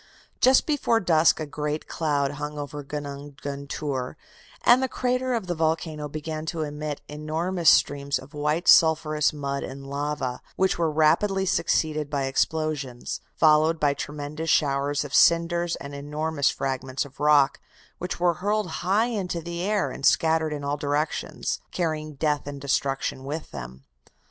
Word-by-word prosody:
"Just 260 +1 +5
before 280 -7 +2
dusk 165 -5 +4
a 155 - -2
great 150 +1 -4
cloud 145 -3 0
hung 150 +1 -5
over 145 0 -5
Gunung 145 0 -7
Guntur, 140 -1 -4 0.5
and 245 +2 +6
the 265 - +1
crater 255 0 0
of 225 -5 -2
the 175 - -2
volcano 160 -2 -1
began 155 +1 -5
to 160 -1 -2
emit 150 0 -5
enormous 160 +3 0
streams 140 0 +3
of 135 +4 -12
white 150 +4 -1
sulphurous 155 -2 +5
mud 140 -2 -3
and 135 +1 -7
lava, 140 -2 -3
which 190 -2 +1
were 165 -1 +2
rapidly 190 +6 +2
succeeded 155 -4 0
by 140 -2 -1
explosions, 135 -2 -2
followed 155 +1 +4
by 145 -2 +3
tremendous 150 +3 -5
showers 140 0 +2
of 145 - -9
cinders 170 +1 +4
and 140 0 -8
enormous 150 +1 -1
fragments 130 0 -2
of 135 - -15
rock, 145 -2 +4 0.4
which 180 -1 -4
were 175 -1 +3
hurled 205 -2 0
high 200 +5 +2
into 195 -7 -2
the 170 +1 -5
air 205 +1 0
and - - -9
scattered 160 -1 +3
in 145 -1 -4
all 140 +1 -1
directions, 145 +1 -2
carrying 155 -3 -2
death 150 0 0
and 145 -1 -6
destruction 135 -1 -1
with 150 +4 -5
them. 65 0 -8
150 Hz, 155 wpm, -25 LUFS, 140-165 Hz, 0.5 s, and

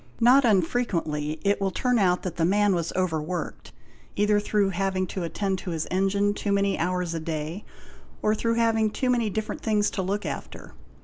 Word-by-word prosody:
Not 250 +3 +6
un 200 -6 +4
frequently 160 -8 -2
it 200 0 +1
will 195 - +1
turn 250 +4 +1
out 180 -2 +2
that 175 -3 -5
the 165 - +1
man 205 +3 +3
was 170 -2 -1
over 175 -4 0
worked, 175 +4 -5 0.4
either 205 0 +3
through 205 -1 +1
having 190 0 -1
to 185 +1 -5
attend 190 +3 -2
to 185 - -6
his 165 -2 -2
engine 195 +2 +1
too 205 0 -3
many 200 0 +2
hours 180 0 -1
a 165 - -2
day, 160 +3 -4 0.6
or 215 - +3
through 230 +1 0
having 225 -2 +2
too 255 +4 0
many 235 -3 +1
different 215 +2 -4
things 210 -2 +1
to 195 - -2
look 195 +3 -2
after. - - -7
195 Hz, 195 wpm, -26 LUFS, 175-210 Hz, 0.6 s, Not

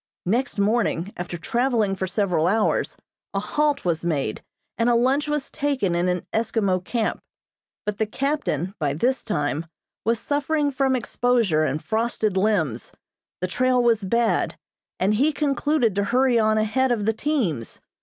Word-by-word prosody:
Next 235 +8 0
morning, 200 -3 +1
after 175 0 -5
traveling 230 0 0
for 190 0 -3
several 180 -4 +1
hours, 215 +3 +1 0.4
a - - +2
halt 290 +6 0
was 170 -2 0
made, 145 -10 -1 0.3
and 230 +1 +2
a 240 - +4
lunch 265 +5 +2
was 295 -2 -2
taken 275 -11 0
in 175 +1 +1
an 180 -1 -1
Eskimo 210 -5 +1
camp; 225 +3 -1 0.7
but 210 -1 -3
the 220 - +1
captain, 215 - -1
by 145 -3 0
this 250 - +1
time, 155 -4 -2 0.4
was 230 +1 +1
suffering 290 +1 0
from 265 -1 +1
exposure 235 -9 +1
and 150 +1 -2
frosted 220 -2 0
limbs, 185 - 0 0.5
the 185 - 0
trail 250 +5 +2
was 230 -3 +3
bad, 230 +4 +1 0.4
and 195 +3 +2
he 275 +8 +3
concluded 290 -5 +1
to 200 +1 0
hurry 250 +2 +3
on 215 0 +3
ahead 245 +5 +1
of 215 -4 0
the 225 - +2
teams. 220 - -2
220 Hz, 155 wpm, -24 LUFS, 185-255 Hz, 0.7 s, a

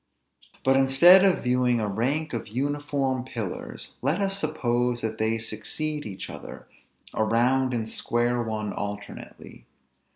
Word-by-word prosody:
But 135 0 +4
instead 135 +8 +7
of 190 -2 +3
viewing 125 -1 +2
a 105 - -1
rank 135 +10 -1
of 115 - -4
uniform 135 +1 -1
pillars, 115 -7 -6
let 165 - +1
us 195 0 0
suppose 125 -6 0
that 110 0 -3
they 110 +1 +1
succeed 115 +7 -3
each 95 -2 -6
other, - - -10 0.5
a 110 - +1
round 125 +4 +2
and 120 -2 -1
a - - -7
square 120 +2 0
one 110 -2 -3
alternately. 100 -10 -8
125 Hz, 140 wpm, -26 LUFS, 110-140 Hz, 0.5 s, instead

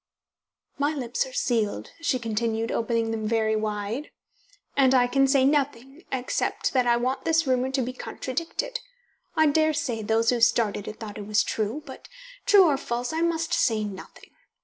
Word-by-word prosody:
"My 290 +2 +1
lips 260 - -2
are - - -11
sealed," 225 - -1
she 295 -5 +1
continued, 225 -1 -2
opening 230 0 0
them 220 -1 -2
very 220 -1 +1
wide, 215 +5 -3 0.7
"and 265 -1 +4
I 250 -1 +5
can 270 +2 +3
say 270 -1 +4
nothing, 280 +1 -1
except 255 -1 -1
that 255 -2 +2
I 235 0 +4
want 255 +2 -1
this 330 0 +2
rumour 255 -1 +1
to 265 -1 0
be 250 +2 -4
contradicted. 335 - -4 0.6
I 315 - +4
daresay 310 -5 +1
those 225 +2 +2
who 240 -2 0
started 225 -3 +2
it 215 - -7
thought 210 -2 -7
it 205 - -7
was 210 0 +3
true, 225 +8 -2
but, 265 - -11 0.4
true 400 -3 +7
or 295 -5 +3
false, 245 +1 -3
I 325 - -1
must 330 -1 0
say 220 -3 +2
nothing. 200 -2 -9
250 Hz, 170 wpm, -26 LUFS, 225-290 Hz, 0.7 s, true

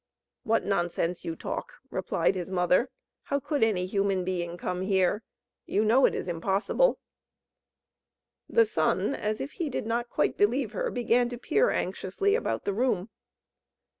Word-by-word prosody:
"What 225 +1 +1
nonsense 175 -2 -1
you 165 - -3
talk!" - - -5 0.2
replied - - +1
his 185 -1 -4
mother. 185 +6 +2 0.4
"How 280 - 0
could 285 -1 0
any 195 -5 +2
human 195 -1 0
being 175 -1 -3
come 180 +1 -3
here? 190 +1 +2 0.5
You 210 +2 +1
know 240 +5 +5
it - - -2
is - - -4
impossible." 195 - +1 1.5
The 460 -1 +5
Sun, 415 - +1
as 215 -3 -2
if 280 - -4
he 335 -5 -3
did 255 - -3
not 235 +2 -1
quite - - 0
believe 230 +2 +2
her, 210 - -2
began 240 0 +2
to 245 - -6
peer 450 - +2
anxiously 405 0 -1
about 465 - -1
the 200 - 0
room. 215 -3 0
210 Hz, 155 wpm, -28 LUFS, 185-250 Hz, 1.5 s, know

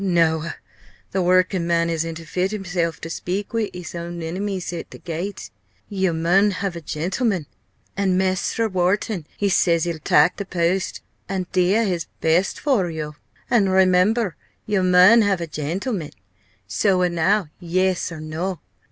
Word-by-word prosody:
_ - - -3
Noa 165 -3 +1 0.6
the 190 - 0
workin' 185 0 +2
man 170 0 +2
isn't 165 0 -2
fit 180 +3 -2
himself 180 -5 -2
to - - -5
speak 185 +5 -4
wi' 225 -2 0
his 180 -2 -8
own 170 0 -5
enemies 185 +2 -3
i' 170 - -3
th' - - -14
gate 175 - -5 0.4
yo 190 -3 0
mun 175 +5 +3
have 195 -2 -3
a 170 - -6
gentleman! 180 - -1 0.5
an' 190 -2 +1
Mester 190 +4 0
Wharton, 185 -2 0
he 205 - +1
says 170 -3 +3
he'll 170 -2 -2
tak' 150 +3 +4
the 200 - -4
post, 180 +1 -1 0.3
an' 190 -2 -2
dea 190 +5 +3
his 175 -3 -2
best 170 +4 +1
for 235 -12 +1
yo 155 -2 -5 0.4
an', 210 -6 +4
remember, 190 +2 +3 0.3
yo 205 -2 +1
mun 185 +5 +7
have 200 -3 +2
a 170 - -2
gentleman! 165 - -3 0.6
Soa 185 -3 +2
now 175 +1 +1
Yes! 185 +1 0
or 165 - -7
No! 160 +3 -4
180 Hz, 155 wpm, -22 LUFS, 170-195 Hz, 0.6 s, mun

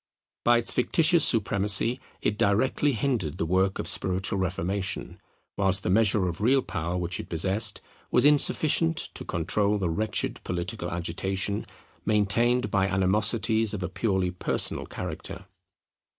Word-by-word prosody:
By 120 0 +5
its 120 - -1
fictitious 160 +5 +3
supremacy 105 +2 +1 0.2
it 105 - +1
directly 120 +8 +1
hindered 110 - -1
the 80 - -1
work 95 +3 +1
of - - -4
spiritual 95 +1 0
reformation, 95 +1 -3 0.4
whilst 95 0 +1
the - - 0
measure 105 -2 +3
of 85 +3 -5
real 130 +4 +3
power 90 +1 -3
which 90 0 -2
it - - -7
possessed 95 +6 +1 0.3
was - - +3
insufficient 155 +2 +3 0.2
to - - -8
control 100 +4 0
the 90 -4 -1
wretched 105 +5 -2
political 90 +1 -4
agitation 95 +4 -2 0.4
maintained 115 +4 +1
by 100 -2 +2
animosities 105 +3 +1
of 95 - -5
a 90 - -3
purely 95 -2 -1
personal 90 - -2
character. - - -7
100 Hz, 135 wpm, -26 LUFS, 90-115 Hz, 0.4 s, By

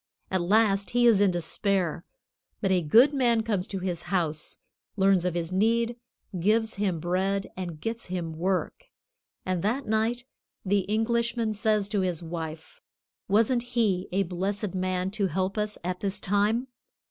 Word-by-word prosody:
At 190 -1 +1
last 200 +1 +3
he 240 - +5
is 220 -4 +6
in 200 - +5
despair, 175 0 0 0.6
but 195 -3 0
a 185 -1 +3
good 235 - +5
man 240 -5 +2
comes 205 -5 -1
to 195 - -4
his 180 -2 -3
house, 160 -5 -1 0.4
learns 195 -3 +3
of 180 -2 -1
his 170 0 -2
need, 230 +5 +2 0.4
gives 220 +5 +2
him 195 -5 -1
bread 190 +4 -1
and 175 -4 -6
gets 225 +6 -4
him 175 -3 -3
work; 185 - -2 0.6
and 185 -2 -1
that 240 +8 -1
night 225 +3 0 0.4
the 200 +1 +3
Englishman 230 +1 0
says 210 -1 +1
to 205 -2 0
his 180 -3 -2
wife, 160 -1 -7 0.5
"Wasn't 225 +5 +3 0.2
he 195 -5 +2
a 195 +2 +2
blessed 195 +2 -2
man 185 0 -1
to 205 -1 0
help 185 +3 -1
us 210 -1 -2
at 180 +1 -3
this 195 -1 -1
time?" 205 +6 +1
195 Hz, 160 wpm, -27 LUFS, 180-220 Hz, 0.6 s, is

